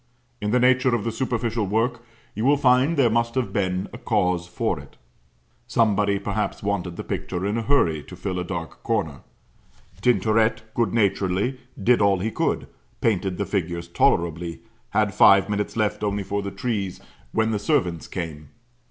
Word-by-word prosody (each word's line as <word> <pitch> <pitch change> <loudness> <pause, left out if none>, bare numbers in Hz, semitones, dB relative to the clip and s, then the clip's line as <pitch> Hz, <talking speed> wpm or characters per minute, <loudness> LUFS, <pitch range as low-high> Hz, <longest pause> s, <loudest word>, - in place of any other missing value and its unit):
In 105 - -1
the 125 +4 +3
nature 130 0 +4
of 110 - -2
the 115 - -1
superficial 115 -3 -1
work 115 +4 0 0.3
you 110 - -3
will 140 +3 +4
find 130 +4 +3
there 135 -4 +5
must 115 +1 0
have 120 -7 -1
been 95 -1 0
a - - -8
cause 90 -1 0
for - - -1
it. - - -14 0.7
Somebody 105 -3 +2
perhaps 105 +1 -3
wanted 95 -4 -2
the - - -5
picture 90 0 -3
in 100 +2 0
a 115 - 0
hurry 95 - +2
to - - -10
fill 95 -2 -3
a - - -1
dark 85 -2 -6
corner. - - -1 0.8
Tintoret 110 -1 +2
good 115 -5 +1
naturedly 100 +3 +1 0.2
did 115 +3 +3
all 100 -1 +4
he 105 +5 -2
could - - -1 0.3
painted 95 -4 0
the - - -1
figures 85 -3 -2
tolerably 85 0 +1 0.3
had 105 -1 +1
five 100 0 +6
minutes 105 +1 -2
left 105 -1 0
only 100 -1 -1
for 100 +1 -2
the 100 - -4
trees, 100 -2 -3 0.3
when 110 0 +1
the 105 - 0
servant 90 - 0
came. 75 -4 -6
105 Hz, 170 wpm, -24 LUFS, 95-115 Hz, 0.8 s, five